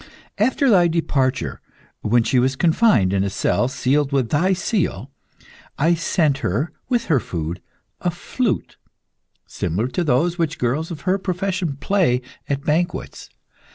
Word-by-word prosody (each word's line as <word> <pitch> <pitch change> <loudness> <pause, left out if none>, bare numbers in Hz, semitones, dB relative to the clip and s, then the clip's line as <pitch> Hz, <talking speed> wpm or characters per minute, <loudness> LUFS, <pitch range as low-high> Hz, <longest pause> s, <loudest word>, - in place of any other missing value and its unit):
After 260 +6 +2
thy 185 -7 +5
departure, 135 - -1 0.4
when 115 +2 +3
she 125 +2 +2
was 130 +2 +1
confined 160 - +3
in 95 -1 +2
a 100 - -1
cell 120 +4 +1
sealed 140 +1 0
with 135 -5 +1
thy 170 +6 +2
seal, 175 - -1 0.7
I 165 +4 +3
sent 160 -4 +1
her, 140 - -1 0.2
with 240 -2 +1
her 150 -6 +3
food, 85 -4 -5 0.4
a 180 - 0
flute, 210 +6 -2 0.7
similar 90 +8 -2
to 175 - -1
those 165 +5 +1
which 155 -2 0
girls 135 +7 -1
of 160 -5 -7
her 185 +4 +1
profession 185 -5 -2
play 155 -9 +1 0.3
at 140 0 -1
banquets. 170 +4 -2
150 Hz, 145 wpm, -21 LUFS, 125-175 Hz, 0.7 s, thy